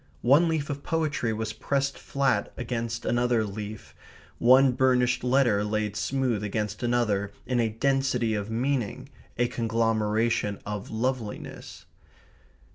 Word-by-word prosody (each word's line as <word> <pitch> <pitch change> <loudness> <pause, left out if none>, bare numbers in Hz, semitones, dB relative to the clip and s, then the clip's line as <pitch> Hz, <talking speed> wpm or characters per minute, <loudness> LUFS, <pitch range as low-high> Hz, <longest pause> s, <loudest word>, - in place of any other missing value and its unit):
One 145 +8 +5
leaf 155 -3 -1
of 140 0 -5
poetry 150 -8 -1
was 110 0 -3
pressed 140 +4 -1
flat 135 -7 0
against 115 -1 -3
another 120 -1 +2
leaf, 105 +1 -7 0.5
one 130 +2 +6
burnished 125 -1 +2
letter 125 -5 +3
laid 105 0 -1
smooth 125 -1 -1
against 105 0 -3
another 110 -5 0
in 125 -1 0
a 115 -1 +2
density 125 -1 +1
of 105 0 -3
meaning, 120 -1 -2 0.3
a 120 +1 +2
conglomeration 115 -2 0
of 105 -1 -5
loveliness. 115 -1 -4
120 Hz, 120 wpm, -27 LUFS, 110-130 Hz, 0.5 s, one